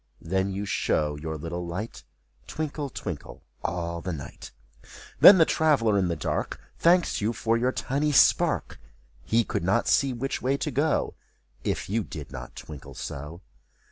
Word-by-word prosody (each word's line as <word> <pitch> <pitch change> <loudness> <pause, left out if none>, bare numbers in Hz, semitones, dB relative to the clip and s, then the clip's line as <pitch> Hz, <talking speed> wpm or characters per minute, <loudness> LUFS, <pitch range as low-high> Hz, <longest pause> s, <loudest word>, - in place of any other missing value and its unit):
Then 95 +3 0
you 100 +2 -3
show 75 -6 0
your 80 +1 -5
little 85 +3 -5
light, 90 +7 -5 0.4
Twinkle, 150 -2 -4
twinkle, - - -7 0.2
all 85 -1 -3
the 90 - -3
night. 70 -5 -8 0.7
Then 195 - +10
the 165 - +6
traveler 140 -12 +2
in 95 - +1
the 85 - -1
dark. 75 - -3 0.2
Thanks 175 -5 +3
you 110 +3 0
for 115 0 0
your 125 +2 +1
tiny 145 +4 -1
spark! 145 - +3 0.4
He 115 +1 +2
could 85 - -3
not 100 +7 +2
see 135 -1 +3
which 130 +2 -3
way 135 +2 +1
to 150 - -2
go, 145 +4 +1 0.5
If - - -2
you 110 +3 0
did 75 -6 -8
not 60 -1 -8
twinkle 75 -4 -10
so. 75 +5 -7
105 Hz, 160 wpm, -26 LUFS, 85-135 Hz, 0.7 s, Then